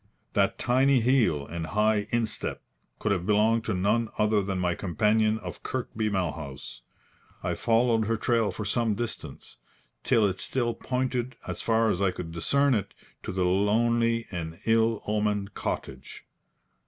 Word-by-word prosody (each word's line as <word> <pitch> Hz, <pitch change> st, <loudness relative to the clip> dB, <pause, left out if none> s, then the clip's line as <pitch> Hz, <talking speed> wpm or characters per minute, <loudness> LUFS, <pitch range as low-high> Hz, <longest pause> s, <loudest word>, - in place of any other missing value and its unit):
That -, -, +2 dB
tiny 130 Hz, +2 st, +3 dB
heel 115 Hz, -, +2 dB
and 85 Hz, +2 st, -5 dB
high 105 Hz, +1 st, +1 dB
instep 115 Hz, -3 st, -2 dB, 0.3 s
could 110 Hz, -, -1 dB
have 90 Hz, -2 st, -1 dB
belonged 110 Hz, +2 st, +3 dB
to 110 Hz, -, -1 dB
none 105 Hz, +5 st, +1 dB
other 105 Hz, -1 st, +3 dB
than 95 Hz, -1 st, -2 dB
my 90 Hz, -1 st, +1 dB
companion 105 Hz, +4 st, +1 dB
of 90 Hz, -5 st, -8 dB
Kirkby 110 Hz, -4 st, -2 dB
Malhouse. 75 Hz, -10 st, -4 dB, 0.6 s
I -, -, 0 dB
followed 115 Hz, -1 st, +2 dB
her 115 Hz, +1 st, 0 dB
trail 115 Hz, -1 st, +1 dB
for 105 Hz, -, -5 dB
some 110 Hz, 0 st, +1 dB
distance, 120 Hz, +1 st, -6 dB, 0.5 s
till 110 Hz, -, +3 dB
it 95 Hz, -2 st, -1 dB
still 120 Hz, -3 st, -1 dB
pointed, 125 Hz, 0 st, -2 dB
as -, -, -4 dB
far 115 Hz, -1 st, +2 dB
as 90 Hz, -, -2 dB
I 100 Hz, -, +3 dB
could 85 Hz, -2 st, -6 dB
discern 140 Hz, +12 st, +2 dB
it, 105 Hz, -4 st, -2 dB, 0.3 s
to -, -, -5 dB
the 90 Hz, -1 st, 0 dB
lonely 115 Hz, +5 st, +2 dB
and 80 Hz, -2 st, -5 dB
ill 115 Hz, -1 st, +2 dB
omened 105 Hz, -1 st, -1 dB
cottage. -, -, -5 dB
110 Hz, 155 wpm, -27 LUFS, 95-115 Hz, 0.6 s, tiny